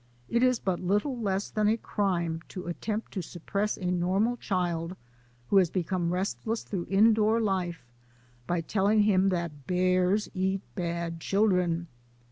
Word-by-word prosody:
It 235 - +1
is 255 -1 +4
but 190 -5 -1
little 205 +9 0
less 200 -4 -2
than 215 -1 +1
a 220 +2 +3
crime 175 -7 -1
to 185 - -7
attempt 210 +6 -3
to 190 - -2
sup 175 0 -11
press 210 +1 0
a 180 -2 -2
normal 190 +7 +1
child 175 -4 -2 0.6
who 200 - +6
has 185 -3 +5
become 175 -1 -1
restless 200 +5 -2
through 185 -4 -4
indoor 215 +2 +4
life 185 - -1 0.6
by 175 -1 0
telling 205 +4 +2
him 195 -2 +4
that 170 -7 -3
bears 185 +3 +2
eat 190 0 0
bad 170 -2 -3
children. 180 -3 +1
190 Hz, 150 wpm, -28 LUFS, 175-210 Hz, 0.6 s, who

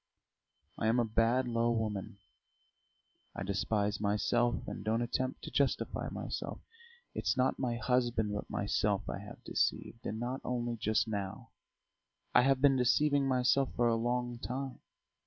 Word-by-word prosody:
I - - +1
am 115 +2 +3
a 120 - +3
bad, 115 +3 +2
low 115 0 +1
woman; 110 -4 -2 1.2
I - - -3
despise 100 +1 0
myself 120 +4 +1
and - - -5
don't 115 +2 +1
attempt 130 +2 -2
to - - -6
justify 140 -1 0
myself. - - -4 0.5
It's - - 0
not 130 +1 +2
my 125 -3 0
husband 120 -4 +1
but 105 - -4
myself 100 0 0
I - - -3
have 105 +1 -11
deceived. 115 - -1
And 110 +2 -3
not 125 +3 -3
only 120 -1 -2
just 110 +1 +1
now; 105 +2 -4 0.8
I 125 - +7
have 135 0 +3
been 140 -2 +5
deceiving 140 +3 +3
myself 130 +1 +2
for 120 - +3
a 115 - +3
long 120 +1 -1
time. 130 +2 -4
120 Hz, 150 wpm, -33 LUFS, 110-125 Hz, 1.2 s, I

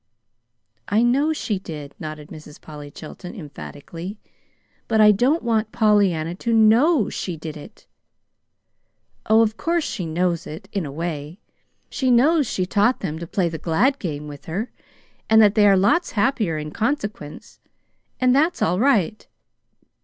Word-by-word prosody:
"I 215 +3 +2
know 275 +6 +2
she 215 -10 -2
did," 150 -6 -8
nodded 155 -1 -8
Mrs. 155 -2 -12
Polly 150 -2 -10
Chilton, 175 +7 -10
emphatically. 165 +2 -9 0.7
"But 220 -1 +1
I 210 0 +8
don't 255 +11 +1
want 220 -2 0
Pollyanna 205 -8 +2
to 235 - -1
know 225 - +4
she 175 -3 -4
did 155 0 -7
it! 150 - -13 1.4
Oh, 220 +1 +5
of 220 0 -2
course 340 0 0
she 185 - -4
knows 170 +1 -1
it, 160 +5 -9
in 195 -7 -3
a - - -7
way. 155 +2 -5 0.5
She 260 -2 -1
knows 280 +4 +4
she 185 - -1
taught 205 +6 +1
them 160 -4 -4
to 170 - -7
play 180 0 0
the 165 -1 -5
glad 250 - +1
game 150 -5 -5
with 145 -1 -10
her, 195 +9 -4 0.6
and 220 0 +6
that 210 -2 +6
they 210 -2 +5
are 195 -1 +5
lots 205 - +2
happier 215 - 0
in 150 0 -5
consequence. 215 - -4 0.6
And 255 0 +3
that's 315 +5 +2
all 180 +3 +1
right. 220 - +1
200 Hz, 155 wpm, -22 LUFS, 160-235 Hz, 1.4 s, I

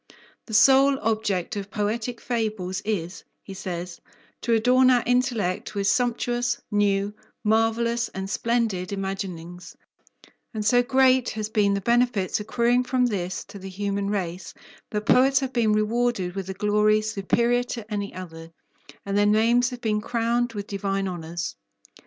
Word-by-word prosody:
The 220 - -3
sole 270 +4 +6
object 215 -5 -1
of 200 -1 -5
poetic 225 +3 -2
fables 215 -6 -2
is, 190 -4 -3 0.2
he 195 - -9
says, 180 -2 -6 0.4
to 235 - 0
adorn 250 +3 +4
our 245 -2 +4
intellect 230 -6 0
with 200 -1 -1
sumptuous, 240 +2 0
new, 205 0 +1 0.3
marvellous, 225 +2 +1
and 190 0 -5
splendid 220 -4 -1
imaginings, 185 -3 -5 0.8
and 215 -1 -3
so 245 +3 +5
great 260 0 +3
has 215 0 -3
been 205 -2 +2
the 200 - -2
benefits 235 -3 +1
accruing 235 +3 +1
from 250 0 +1
this 190 -6 -2
to 200 - -11
the 195 0 -8
human 200 +1 -2
race, 185 -3 -4 0.3
that 210 -1 -3
poets 265 +5 +5
have 265 -1 -3
been 230 -3 +2
rewarded 215 -3 0
with 195 -1 -5
a 190 - -4
glory 210 +1 +2
superior 235 +4 +1
to 230 -3 -6
any 200 -1 -3
other, 165 -3 -9 0.6
and 200 0 -2
their 205 0 +4
names 230 +4 +3
have 250 -2 -8
been 210 -2 0
crowned 235 +1 0
with 205 -2 -5
divine 195 -1 -2
honours. 170 - -5
210 Hz, 150 wpm, -25 LUFS, 195-240 Hz, 0.8 s, sole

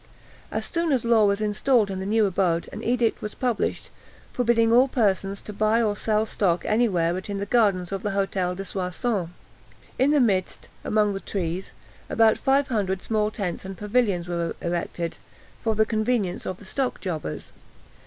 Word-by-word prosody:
As - - -3
soon 335 -2 -1
as 255 -4 +1
Law 230 -2 +5
was 200 +1 +1
installed 215 +1 +2
in 190 - -4
his 190 - -4
new 220 +1 +3
abode, 180 -3 +1
an - - -7
edict 240 -1 +1
was 210 - -5
published, 245 -5 -1 0.4
forbidding 230 -2 +3
all 250 +3 +6
persons 200 -5 0
to 210 - -8
buy 215 +2 +2
or 215 -3 +1
sell 215 +1 +1
stock 180 -5 0
any 230 +2 +3
where 170 -3 +1
but 185 +3 -5
in 200 - -2
the 200 - -2
gardens 200 -6 +2
of 195 -1 -3
the 210 - -2
Hôtel 195 -2 -1
de 195 +1 -6
Soissons. 185 +1 -2 0.7
In 265 - +4
the 295 0 +4
midst, 195 -7 0
among 210 -1 +2
the 195 - -3
trees, 185 -2 -4 0.4
about 225 -1 +4
five 275 +1 +2
hundred 190 -5 -1
small 215 -1 +1
tents 195 -5 -4
and 190 -1 -7
pavilions 210 -5 0
were 170 -1 -2
erected, 170 -1 -3 0.5
for 225 -1 +1
the 220 +1 +3
convenience 215 -4 -1
of 185 - -3
the 205 - -14
stock 260 +6 -2
jobbers. 160 - -5
205 Hz, 185 wpm, -25 LUFS, 185-230 Hz, 0.7 s, all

